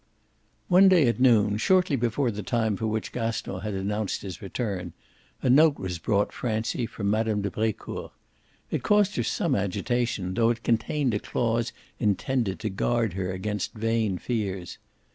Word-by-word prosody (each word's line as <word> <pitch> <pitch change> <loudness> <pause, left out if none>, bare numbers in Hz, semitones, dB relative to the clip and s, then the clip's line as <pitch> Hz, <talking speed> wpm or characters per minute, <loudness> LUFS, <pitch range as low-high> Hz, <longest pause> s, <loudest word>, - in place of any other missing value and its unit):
XI - - -41
One 190 +2 +7
day 170 -8 +5
at 120 - 0
noon, 110 -5 +4
shortly 180 - +3
before 120 +1 0
the 105 0 -5
time 110 0 0
for 110 +3 -2
which 110 0 -2
Gaston 115 -5 -3
had 105 +1 -4
announced 100 +1 -2
his 95 -3 -7
return, 100 -2 -4 0.5
a - - +1
note 145 +3 +5
was 90 -3 -4
brought 100 +4 0
Francie 115 0 -2
from 100 -3 -2
Mme. 110 -1 +1
de 100 - -2
Brecourt. 110 +1 -3 0.6
It - - -1
caused 210 -1 +3
her - - +1
some 165 -5 0
agitation, 100 -1 -1
though 115 +3 +3
it 120 -1 -2
contained 120 +3 +1
a 105 - 0
clause 115 0 -1 0.3
intended 105 0 0
to 110 - -1
guard 115 +1 0
her 95 0 -2
against 105 +3 -3
vain 110 -3 0
fears. 95 -4 -3
110 Hz, 165 wpm, -26 LUFS, 100-120 Hz, 0.6 s, One